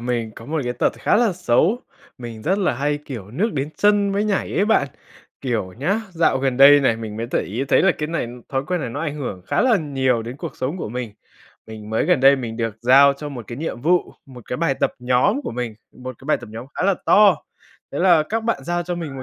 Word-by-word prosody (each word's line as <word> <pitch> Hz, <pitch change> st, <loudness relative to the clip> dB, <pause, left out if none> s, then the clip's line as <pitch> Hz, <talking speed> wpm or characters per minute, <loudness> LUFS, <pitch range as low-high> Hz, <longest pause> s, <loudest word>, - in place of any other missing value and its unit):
mình 120 Hz, -2 st, -2 dB
có 115 Hz, -, -11 dB
một 155 Hz, 0 st, -2 dB
cái 125 Hz, -, -1 dB
tật 120 Hz, -, 0 dB
khá -, -, +2 dB
là 225 Hz, -4 st, +3 dB
xấu, 175 Hz, -, +1 dB, 0.4 s
mình 115 Hz, -3 st, -8 dB
rất 190 Hz, +4 st, +1 dB
là 185 Hz, -10 st, +1 dB
hay, 145 Hz, +3 st, -1 dB
kiểu, 110 Hz, -8 st, -8 dB
nước 200 Hz, -, -1 dB
đến 140 Hz, 0 st, -2 dB
chân 205 Hz, -1 st, +3 dB
mới 205 Hz, +2 st, 0 dB
nhảy 205 Hz, -2 st, -1 dB
ấy 200 Hz, -, +2 dB
bạn, 210 Hz, -11 st, +2 dB, 0.5 s
kiểu 115 Hz, -8 st, -2 dB
nhá, 165 Hz, -, -1 dB
dạo 165 Hz, -6 st, +2 dB
gần 130 Hz, -2 st, 0 dB
đây 145 Hz, +1 st, +8 dB
này 115 Hz, -5 st, +2 dB
mình 110 Hz, -2 st, -7 dB
mới 115 Hz, -, -3 dB
để -, -, +1 dB
ý 115 Hz, +8 st, -3 dB
thấy -, -, +4 dB
là 190 Hz, -2 st, +4 dB
cái 150 Hz, -, -2 dB
này 165 Hz, -6 st, -2 dB, 0.2 s
thói 135 Hz, -1 st, -1 dB
quen 180 Hz, -1 st, -1 dB
này 125 Hz, -, -4 dB
nó 140 Hz, -, -5 dB
ảnh 155 Hz, -3 st, -3 dB
hưởng 120 Hz, -11 st, -5 dB
khá -, -, 0 dB
là 245 Hz, -3 st, +4 dB
nhiều 135 Hz, -7 st, 0 dB
đến 120 Hz, +3 st, -7 dB
cuộc -, -, -7 dB
sống 135 Hz, +7 st, -3 dB
của 165 Hz, -, -5 dB
mình. 120 Hz, -2 st, -5 dB, 0.5 s
Mình 110 Hz, -1 st, -10 dB
mới 110 Hz, -, +1 dB
gần 180 Hz, -7 st, +3 dB
đây 135 Hz, +1 st, +6 dB
mình 115 Hz, -4 st, -5 dB
được 115 Hz, -2 st, -3 dB
giao 135 Hz, +4 st, +6 dB
cho 145 Hz, +2 st, -7 dB
một 125 Hz, -5 st, -8 dB
cái 120 Hz, -, -7 dB
nhiệm 155 Hz, -5 st, -4 dB
vụ, 175 Hz, +6 st, +1 dB
một 125 Hz, -4 st, -13 dB
cái 125 Hz, -, -2 dB
bài 155 Hz, -5 st, +1 dB
tập -, -, 0 dB
nhóm 125 Hz, -, +2 dB
của -, -, -4 dB
mình, 120 Hz, -2 st, -4 dB, 0.2 s
một 130 Hz, -1 st, -9 dB
cái 135 Hz, -, -15 dB
bài 155 Hz, -, +3 dB
tập -, -, -11 dB
nhóm 115 Hz, +3 st, -7 dB
khá -, -, -3 dB
là 200 Hz, -, +3 dB
to, 205 Hz, -4 st, +6 dB, 0.6 s
thế 140 Hz, -, -3 dB
là 175 Hz, -3 st, +5 dB
các 220 Hz, +8 st, -3 dB
bạn 230 Hz, -, -1 dB
giao 175 Hz, 0 st, -1 dB
cho 175 Hz, +1 st, -4 dB
mình 155 Hz, -6 st, -6 dB
một 130 Hz, -, -6 dB
135 Hz, 260 wpm, -21 LUFS, 120-175 Hz, 0.6 s, đây